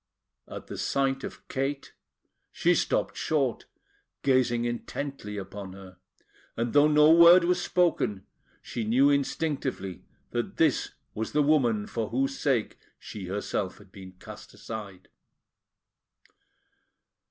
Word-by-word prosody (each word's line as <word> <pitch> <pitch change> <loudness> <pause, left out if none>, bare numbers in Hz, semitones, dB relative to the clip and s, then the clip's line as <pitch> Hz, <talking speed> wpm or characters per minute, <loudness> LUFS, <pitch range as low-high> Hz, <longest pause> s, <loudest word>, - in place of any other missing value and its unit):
At - - -8
the - - -8
sight 135 -1 0
of - - -8
Kate, 135 +1 -3 0.6
she - - +2
stopped - - 0
short, 140 -6 -1 0.6
gazing 125 -3 +2
intently 120 -2 -5
upon 95 -1 -7
her; 95 -1 -13 0.6
and 115 +1 -1
though 145 +1 +6
no 150 +1 +6
word 170 +2 +8
was 180 +1 +1
spoken, 170 - 0 0.4
she 115 - -4
knew 130 +6 +4
instinctively 140 - -2 0.3
that - - -3
this - - +1 0.2
was 110 +1 -4
the 150 0 +3
woman 120 -8 +2
for 115 -1 -4
whose 135 +3 -1
sake 130 -6 0 0.2
she 100 -4 -8
herself 95 0 -3
had 105 -2 -18
been 95 -1 -11
cast 90 - -12
aside. 105 -5 -8
120 Hz, 120 wpm, -27 LUFS, 105-145 Hz, 0.6 s, word